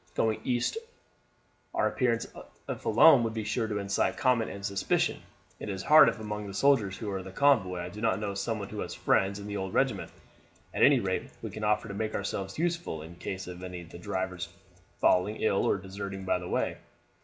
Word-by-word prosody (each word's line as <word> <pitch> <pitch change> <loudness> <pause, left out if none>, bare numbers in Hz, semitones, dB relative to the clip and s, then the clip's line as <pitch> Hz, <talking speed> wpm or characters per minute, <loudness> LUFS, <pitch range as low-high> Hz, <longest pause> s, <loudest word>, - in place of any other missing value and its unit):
Going 110 -1 +1
east 125 - 0 1.0
our - - +3
appearance 115 -3 0 0.4
if - - -5
alone 120 +5 +7
would 115 -1 -2
be 110 - -2
sure 110 +2 -1
to 105 -1 -2
incite 100 -1 0
comment 125 -4 +2
and 100 0 -7
suspicion. 100 -1 0 0.4
It - - -6
is 95 -1 -4
hard 155 +6 +8
if - - -5
among 105 -1 -5
the 100 - -7
soldiers 110 -7 +3
with 100 -4 -3
the 95 - -9
convoy 95 -8 +3
I 90 - -5
do 105 +4 -9
not 110 -4 +1
know 105 -2 -3
someone 100 0 -3
who 105 - -6
has - - -4
friends 95 +1 +2
in 100 - -8
the 105 0 -4
old 95 -1 -4
regiment. - - +1 0.6
At - - -2
any - - +7
rate - - -2
we - - -4
can 110 - -7
offer 105 0 +1
to 100 - -6
make 110 +2 -3
ourselves 95 -1 -3
useful 165 - -2
in 85 +2 -11
case 95 +1 -5
of 90 0 -8
any 90 -1 -6
of 85 - -14
the 85 - -10
drivers 95 -2 -3 0.5
falling 95 +4 +3
ill 110 -3 +1
or - - +2
deserting 95 0 -6
by 90 - +1
the 90 - -7
way." - - -1
100 Hz, 210 wpm, -29 LUFS, 95-110 Hz, 1.0 s, hard